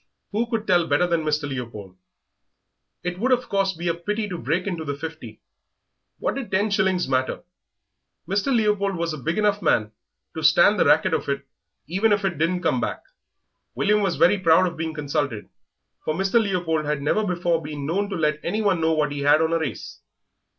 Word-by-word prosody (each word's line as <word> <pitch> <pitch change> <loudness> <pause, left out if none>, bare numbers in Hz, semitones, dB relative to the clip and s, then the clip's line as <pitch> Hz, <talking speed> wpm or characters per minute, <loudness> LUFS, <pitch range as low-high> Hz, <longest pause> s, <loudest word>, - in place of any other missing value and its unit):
Who 230 +3 -1
could 225 -2 -2
tell 175 -4 +3
better 145 +5 +3
than 170 -2 0
Mr. 150 -1 0
Leopold? 115 -8 -7 1.1
It 180 0 -4
would, 255 +5 +1
of 250 0 +2
course, 195 -1 +1
be 170 +1 -5
a 170 - +2
pity 210 +6 -3
to 180 - -4
break 160 +9 -1
into 175 -5 -3
the 145 -2 -3
fifty. 160 +2 -8 0.8
What - - -1
did 270 -4 -5
ten 205 +3 +1
shillings 190 -3 +1
matter? 130 -1 -1 0.8
Mr. 200 +8 0
Leopold 210 -4 +1
was 170 -1 -2
a 155 - -6
big 165 +6 -2
enough 210 -1 +1
man 105 - +1 0.4
to 160 - -5
stand 170 +7 +5
the - - +4
racket 185 - +4
of 160 - -1
it 140 0 -2 0.4
even 195 +9 +1
if 205 -1 +2
it 175 -6 -2
didn't 180 +3 0
come - - +1
back. - - -3 0.7
William 210 +1 +2
felt 195 -4 0
very 200 +3 +4
proud 170 0 +5
of 175 -2 -3
being 160 -1 -4
consulted, 140 -6 -2 0.5
for 155 - -1
Mr. 195 +6 +2
Leopold 175 -6 -1
had 150 -1 -1
never 215 +9 +1
before 175 -3 0
been 150 -2 -6
known 200 +7 -1
to 195 - -3
let 150 -2 0
anyone 205 -5 0
know 160 0 +2
what 150 -2 +1
he 145 - -4
had 145 +2 +4
on 160 +1 +1
a 165 - +2
race. 160 - -6
170 Hz, 200 wpm, -23 LUFS, 155-200 Hz, 1.1 s, stand